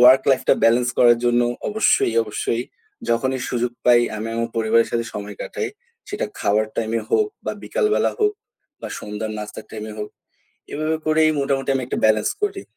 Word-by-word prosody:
Work 125 +2 +8
লাইফটা 130 - +3
balance 120 +2 +4
করার 120 -1 +6
জন্য 120 0 +3 0.3
অবশ্যই, 210 - +2
অবশ্যই 115 +2 -2 0.5
যখনই 130 +3 0
সুযোগ 120 0 -1
পাই 120 -1 +6 0.2
আমি 110 +2 -4
আমার 115 0 -1
পরিবারের 115 +1 +3
সাথে 115 0 -1
সময় 105 -1 -6
কাটাই। 440 - -4 0.4
সেটা 410 - -2
খাবার 105 +2 +2
টাইম-এ 115 0 -1
হোক 430 -1 +3 0.2
বা - - -2
বিকালবেলা 425 0 +1
হোক 420 0 +3 0.5
বা - - -6
সন্ধ্যার 105 +1 -5
নাস্তার 105 0 -7
টাইম-এ 110 0 -6
হোক, 105 - -4 0.6
এভাবে 155 +2 -1
করেই 155 0 +4
মোটামুটি 135 -1 -1
অনেকটা 130 0 -3
ব্যালান্স 110 -1 +3
করি। 400 -1 -1
120 Hz, 160 wpm, -21 LUFS, 110-140 Hz, 0.6 s, Work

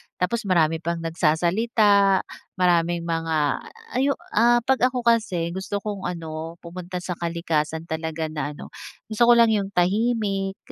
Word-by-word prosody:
Tapos 210 +3 -2
marami 165 -3 +2
pang 170 +1 -2
nagsasalita, 195 +5 +2 0.3
maraming 175 -2 +2
mga 165 -1 -2 0.6
ay 275 - +2
'yung, 280 - +1 0.2
ah, 240 +1 +4
'pag 260 -1 +3
ako 250 -2 -3
kasi 200 -8 +1
gusto 195 +2 -4
kong 205 -4 -4
ano 165 -1 -6
pumunta 180 +1 -7
sa 180 - -3
kalikasan 165 -2 -2
talaga 160 -1 -4
na 150 -1 -4
ano, - - -11 0.4
gusto 235 +2 +3
ko 240 - +7
lang 230 -1 +5
'yung 200 -2 0
tahimik, 195 0 0
180 Hz, 145 wpm, -23 LUFS, 165-215 Hz, 0.6 s, ko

